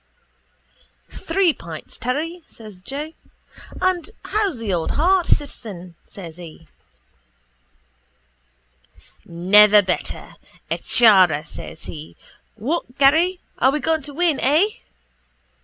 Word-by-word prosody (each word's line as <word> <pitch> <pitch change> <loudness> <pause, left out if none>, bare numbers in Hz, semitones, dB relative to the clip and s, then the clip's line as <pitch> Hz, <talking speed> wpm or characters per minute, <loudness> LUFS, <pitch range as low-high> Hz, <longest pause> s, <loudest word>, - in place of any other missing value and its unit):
—Three 380 -5 +1
pints, 165 - -10
Terry, 310 +8 -3
says 215 -5 -13
Joe. 290 - -5 0.7
And 370 -1 0 0.2
how's 410 - -1
the 220 -4 -3
old 170 -2 -1
heart, 360 +3 +2
citizen? 200 - -3
says 170 -4 -10
he. 165 -2 -12 2.6
—Never 205 +5 +5
better, 185 -1 -4 0.3
a - - -1
chara, 185 -10 +4
says 160 +1 -10
he. 155 -1 -9 0.4
What 250 +3 -3
Garry? 325 +7 +3 0.2
Are 260 - +4
we 295 +3 0
going 320 +1 0
to 290 +1 -10
win? 335 -4 +1
Eh? 310 +10 +3
250 Hz, 105 wpm, -21 LUFS, -, 2.6 s, Never